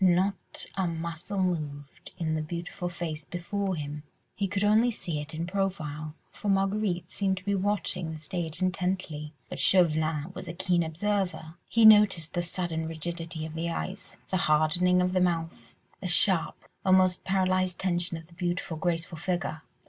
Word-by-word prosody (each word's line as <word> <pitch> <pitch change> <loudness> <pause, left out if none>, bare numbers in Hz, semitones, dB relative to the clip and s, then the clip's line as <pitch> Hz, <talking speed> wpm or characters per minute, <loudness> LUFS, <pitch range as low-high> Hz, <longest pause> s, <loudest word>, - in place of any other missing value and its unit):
Not 185 +2 +1
a 190 -2 +1
muscle 170 +4 -2
moved 145 -5 -3
in 160 -3 -1
the 155 - 0
beautiful 175 +3 -4
face 165 -3 -4
before 190 +3 -2
him. 150 -1 -5 0.3
He 200 - -1
could 200 +1 -1
only 215 +4 +5
see 170 -9 -3
it 150 +2 -7
in 165 +2 -2
profile, 160 -6 -2 0.2
for 210 - -4
Marguerite 195 -2 +1
seemed 190 -2 0
to 185 - -8
be 200 - +1
watching 190 -3 -1
the 160 - -5
stage 160 +2 -3
intently, 180 -5 -1 0.2
but - - -6
Chauvelin 160 -3 +3
was - - -7
a 170 - -4
keen 180 -1 +2
observer; 175 0 -1 0.2
he 230 -1 +5
noticed 205 -7 +7
the 175 - +1
sudden 170 -2 -2
rigidity 165 0 -4
of 160 - -7
the 165 +1 -2
eyes, 190 +3 -4
the 185 - +2
hardening 175 +2 +3
of 180 0 0
the 185 - +3
mouth, 165 -2 -1 0.2
the 190 - -4
sharp, 180 -1 +3 0.2
almost 185 -1 +4
paralysed 185 -1 +1
tension 175 -2 0
of 165 - -10
the 170 - -20
beautiful, 175 -1 -2
graceful 165 0 -2
figure. 175 -3 -2
175 Hz, 165 wpm, -28 LUFS, 160-190 Hz, 0.3 s, noticed